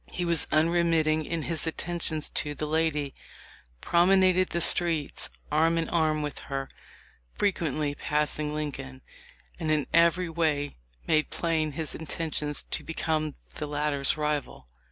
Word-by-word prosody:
He 175 Hz, -, -3 dB
was 170 Hz, -2 st, +3 dB
unremitting 160 Hz, -1 st, +3 dB
in 165 Hz, 0 st, -2 dB
his 165 Hz, -1 st, -1 dB
attentions 165 Hz, -2 st, -1 dB
to 150 Hz, 0 st, -2 dB
the 150 Hz, -, -3 dB
lady, 150 Hz, -2 st, 0 dB, 0.7 s
promenaded 185 Hz, +1 st, +4 dB
the 170 Hz, -, -1 dB
streets 165 Hz, -3 st, +1 dB, 0.2 s
arm 165 Hz, +2 st, +3 dB
in 165 Hz, -, 0 dB
arm 155 Hz, -2 st, +1 dB
with 145 Hz, -2 st, -4 dB
her 135 Hz, -1 st, -3 dB, 0.3 s
— -, -, -31 dB
frequently 155 Hz, -7 st, 0 dB
passing 150 Hz, +1 st, 0 dB
Lincoln 130 Hz, -, -5 dB, 0.3 s
— -, -, -27 dB
and 160 Hz, -, -2 dB
in 155 Hz, -2 st, +2 dB
every 170 Hz, +2 st, +4 dB
way 155 Hz, -, 0 dB, 0.3 s
made 155 Hz, -1 st, +2 dB
plain 160 Hz, -3 st, 0 dB
his 155 Hz, +1 st, -4 dB
intention 155 Hz, -2 st, -2 dB, 0.2 s
to -, -, -1 dB
become 155 Hz, -2 st, -1 dB, 0.2 s
the 150 Hz, -, -3 dB
latter's 145 Hz, -1 st, 0 dB
rival. 150 Hz, -, -2 dB
155 Hz, 140 wpm, -28 LUFS, 150-165 Hz, 0.7 s, promenaded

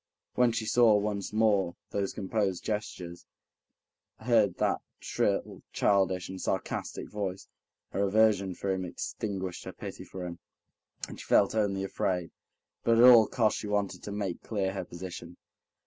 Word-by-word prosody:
When 125 Hz, -1 st, +4 dB
she 115 Hz, -1 st, -2 dB
saw 115 Hz, -1 st, +5 dB
once 100 Hz, -1 st, -1 dB
more 105 Hz, -5 st, +2 dB, 0.2 s
those 100 Hz, -1 st, -1 dB
composed 95 Hz, -2 st, -1 dB
gestures, 95 Hz, -5 st, -4 dB, 0.9 s
heard 110 Hz, -5 st, +3 dB
that -, -, +1 dB, 0.2 s
shrill, -, -, -1 dB
childish, 95 Hz, -3 st, +2 dB
and 95 Hz, 0 st, -7 dB
sarcastic -, -, -3 dB
voice, 100 Hz, -3 st, -4 dB, 0.4 s
her 100 Hz, +1 st, 0 dB
aversion 100 Hz, -3 st, +3 dB
for 100 Hz, -, -2 dB
him 95 Hz, -1 st, -1 dB
extinguished 95 Hz, 0 st, -4 dB
her -, -, -6 dB
pity -, -, -8 dB
for 90 Hz, -1 st, -7 dB
him, 85 Hz, -1 st, -7 dB, 0.7 s
and -, -, -10 dB
she -, -, -9 dB
felt 100 Hz, -, +4 dB
only 100 Hz, -3 st, 0 dB
afraid, 90 Hz, -2 st, -1 dB, 0.5 s
but 115 Hz, 0 st, +4 dB
at 115 Hz, -, +7 dB
all 120 Hz, -4 st, +9 dB
costs 110 Hz, -3 st, +1 dB
she 105 Hz, -, -5 dB
wanted 100 Hz, -3 st, -1 dB
to 105 Hz, -, -7 dB
make 100 Hz, -4 st, -3 dB
clear 95 Hz, -3 st, -2 dB
her 95 Hz, -, -4 dB
position. 85 Hz, -1 st, -8 dB
100 Hz, 150 wpm, -29 LUFS, 95-110 Hz, 0.9 s, all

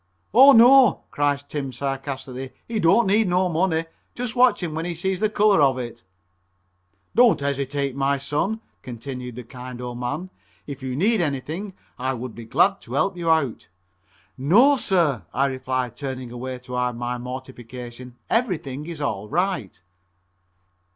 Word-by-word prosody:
"Oh, 265 Hz, +5 st, +9 dB
no," 250 Hz, 0 st, +7 dB
cries 145 Hz, -1 st, 0 dB
Tim 145 Hz, -2 st, -5 dB
sarcastically, 135 Hz, 0 st, -5 dB
"he 230 Hz, -2 st, -2 dB
don't 205 Hz, +7 st, +4 dB
need 210 Hz, +2 st, +3 dB
no 180 Hz, +1 st, +2 dB
money. 165 Hz, -1 st, +1 dB, 0.3 s
Just 245 Hz, -2 st, -4 dB
watch 250 Hz, -5 st, +4 dB
him 165 Hz, -3 st, -3 dB
when 160 Hz, +1 st, -3 dB
he 175 Hz, -1 st, -3 dB
sees 190 Hz, +2 st, -2 dB
the 215 Hz, 0 st, +2 dB
color 210 Hz, -5 st, +4 dB
of 135 Hz, -2 st, +4 dB
it." 120 Hz, -5 st, -6 dB, 1.1 s
"Don't 240 Hz, -1 st, +5 dB
hesitate, 140 Hz, -1 st, -2 dB
my 140 Hz, 0 st, +1 dB
son," 150 Hz, +11 st, -2 dB, 0.2 s
continued 125 Hz, 0 st, -7 dB
the 125 Hz, -, -7 dB
kind 125 Hz, +1 st, -9 dB
old 120 Hz, -1 st, -6 dB
man, 145 Hz, +10 st, -4 dB, 0.3 s
"if 140 Hz, -1 st, -8 dB
you 130 Hz, -1 st, -4 dB
need 205 Hz, -, +2 dB
anything 160 Hz, +6 st, -3 dB, 0.2 s
I 130 Hz, +1 st, -1 dB
would 125 Hz, -1 st, -6 dB
be 115 Hz, -, -9 dB
glad 195 Hz, -, +2 dB
to -, -, -10 dB
help 195 Hz, -1 st, +1 dB
you 170 Hz, -2 st, -2 dB
out." 155 Hz, -7 st, +1 dB, 0.7 s
"No, 225 Hz, -, +5 dB
sir," 170 Hz, -, +1 dB
I 135 Hz, +2 st, +3 dB
replied, 130 Hz, -2 st, -2 dB
turning 130 Hz, -3 st, -6 dB
away 125 Hz, +1 st, -5 dB
to 125 Hz, 0 st, -11 dB
hide 125 Hz, -1 st, 0 dB
my 120 Hz, +1 st, -3 dB
mortification, 125 Hz, -1 st, -8 dB
"everything 155 Hz, -, -1 dB
is 165 Hz, -3 st, -6 dB
all 105 Hz, -7 st, -3 dB
right." 175 Hz, -, -1 dB
140 Hz, 155 wpm, -23 LUFS, 125-185 Hz, 1.1 s, Oh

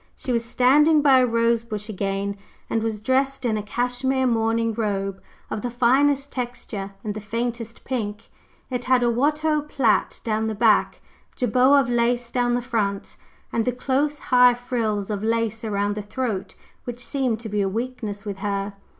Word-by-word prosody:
She 255 Hz, -, -5 dB
was 235 Hz, -1 st, +1 dB
standing 290 Hz, +6 st, +4 dB
by 270 Hz, -3 st, +6 dB
a 250 Hz, -, +3 dB
rosebush 230 Hz, -2 st, 0 dB
again, 200 Hz, -1 st, -2 dB, 0.4 s
and 225 Hz, -, +1 dB
was 220 Hz, -2 st, -3 dB
dressed 265 Hz, +3 st, 0 dB
in 225 Hz, -2 st, +1 dB
a 210 Hz, -, -1 dB
cashmere 245 Hz, +4 st, -1 dB
morning 230 Hz, -1 st, +1 dB
robe 195 Hz, -3 st, -2 dB, 0.3 s
of 215 Hz, -, -3 dB
the 245 Hz, -, -2 dB
finest 275 Hz, +4 st, +2 dB
texture 240 Hz, -6 st, -5 dB
and 210 Hz, -, -3 dB
the 215 Hz, -, -6 dB
faintest 230 Hz, +2 st, -4 dB
pink: 220 Hz, -5 st, -4 dB, 0.4 s
it 245 Hz, -1 st, -3 dB
had 255 Hz, -1 st, +3 dB
a 240 Hz, -, +3 dB
Watteau 300 Hz, +5 st, +1 dB
plait 270 Hz, -7 st, +1 dB
down 220 Hz, -1 st, 0 dB
the 220 Hz, -, -2 dB
back, -, -, +3 dB, 0.3 s
jabot 255 Hz, +4 st, +4 dB
of 255 Hz, -, -3 dB
lace 240 Hz, 0 st, 0 dB
down 245 Hz, -1 st, +1 dB
the 245 Hz, -, -1 dB
front, 210 Hz, -5 st, -2 dB, 0.4 s
and 230 Hz, -, +1 dB
the 250 Hz, -, +1 dB
close, 275 Hz, +4 st, 0 dB, 0.2 s
high 250 Hz, -1 st, +7 dB
frills 225 Hz, -5 st, -2 dB
of 205 Hz, 0 st, -3 dB
lace 225 Hz, 0 st, 0 dB
around 205 Hz, -1 st, 0 dB
the 210 Hz, -, -4 dB
throat 205 Hz, -3 st, -4 dB, 0.3 s
which 245 Hz, 0 st, -6 dB
seemed 255 Hz, -4 st, -1 dB
to 225 Hz, -, -6 dB
be 210 Hz, 0 st, 0 dB
a 195 Hz, -, +1 dB
weakness 220 Hz, -2 st, -4 dB
with 200 Hz, -2 st, -5 dB
her. 200 Hz, 0 st, -2 dB
235 Hz, 175 wpm, -23 LUFS, 210-250 Hz, 0.4 s, high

